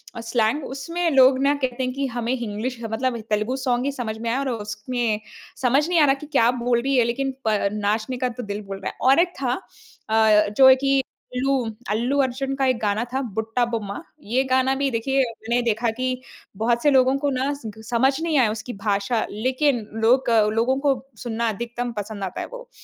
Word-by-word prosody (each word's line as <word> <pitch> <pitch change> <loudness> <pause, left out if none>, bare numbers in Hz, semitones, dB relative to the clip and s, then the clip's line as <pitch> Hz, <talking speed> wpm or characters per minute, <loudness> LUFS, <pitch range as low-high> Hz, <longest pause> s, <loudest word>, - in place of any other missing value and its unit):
अ, 230 - -5
slang 230 +4 0
उसमे 335 +6 -2
लोग 260 -2 +5
ना 280 +1 +4
कहते 260 -2 -2
हैं 255 0 -2
कि 275 +1 -2
हमें 240 0 -2
हिंग्लिश 235 +1 -4
ह 225 - -2
मतलब 245 +1 -1
तेलुगु 215 +4 0
सॉन्ग 255 -1 0
ही 280 - 0
समझ 225 -5 -4
में 230 +1 -3
आया 255 +4 0
और 275 -1 -1
उसमें 220 0 -2 0.4
समझ 270 +5 +3
नहीं 345 -2 +3
आ 295 - +6
रहा 270 - +4
कि - - -5
क्या 240 -6 +3 0.2
बोल 240 -1 +2
रही 275 +1 0
है 245 - +5
लेकिन 270 +3 -1 0.2
प 215 -1 +3 0.2
नाचने 215 +4 -1
का 250 0 0
तो 245 +1 -7
दिल 205 0 -4
बोल 195 0 -7
रहा 190 - -3
है। - - -25
और 275 - +5
एक 350 +1 +2
था 250 -2 +1 0.6
अ, 215 -1 +4
जो 265 -1 +8
है 260 - +8
कि 275 0 +2 0.3
अल्लू 270 +2 +1 0.4
अल्लू 240 +6 0
अर्जुन 270 +1 -2
का 270 -1 0
एक 255 -2 +2
गाना 210 +1 0
था 265 - 0 0.2
"बुट्टा 225 +3 0
बोम्मा" 210 +2 -4 0.2
ये 250 +5 +1
गाना 260 +1 +3
भी 275 - +2
देखिए 265 +4 +1 0.2
मैंने 235 +2 0
देखा 235 0 0
कि 255 - -1 0.5
बहुत 235 +1 +1
से 295 - +5
लोगों 260 0 +4
को 285 - +2
ना 265 +1 0
स 225 -6 -7 0.2
समझ 250 +3 +3
नहीं 325 -3 +1
आया 225 -4 +3
उसकी 220 +3 -6
भाषा 205 +2 0
लेकिन 255 +3 0 0.2
लोक 250 +2 +4 0.2
लोगों 235 +4 +2
को 280 -1 +3 0.3
सुनना 235 0 -1
अधिकतम 240 +3 -4
पसंद 205 -1 -5
आता 185 - -4
है - - -5
वो। - - -10
245 Hz, 215 wpm, -23 LUFS, 225-270 Hz, 0.6 s, जो